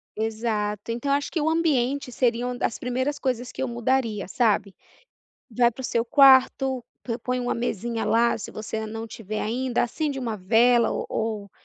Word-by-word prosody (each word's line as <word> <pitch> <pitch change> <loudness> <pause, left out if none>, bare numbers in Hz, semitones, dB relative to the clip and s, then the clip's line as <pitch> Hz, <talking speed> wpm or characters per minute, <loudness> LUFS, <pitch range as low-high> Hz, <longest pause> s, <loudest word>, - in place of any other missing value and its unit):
Exato, 215 -1 -2
então 240 +4 -3
acho 285 0 -1
que 330 - -1
o 305 +2 +1
ambiente 280 -5 +1
seria 240 -1 +1
uma 250 0 -4
das 230 - -1
primeiras 260 +4 -2
coisas 250 -2 -2
que - - -4
eu - - -1
mudaria, 235 -3 -1
sabe? 210 -4 +1 0.8
Vai 240 +1 +4
pro 260 +3 -9
seu 230 -1 0
quarto, 265 -2 +5 0.4
põe 250 0 -1
uma 245 0 -1
mesinha 230 -1 -2
lá, 235 +1 +3
se 210 - -7
você 220 0 -5
não 225 +1 -6
tiver 215 -1 -5
ainda, 245 +2 0
acende 280 +3 -2
uma 230 -4 -3
vela 230 +5 +4
ou - - -3
ou 215 -3 -3
240 Hz, 170 wpm, -25 LUFS, 220-260 Hz, 0.8 s, quarto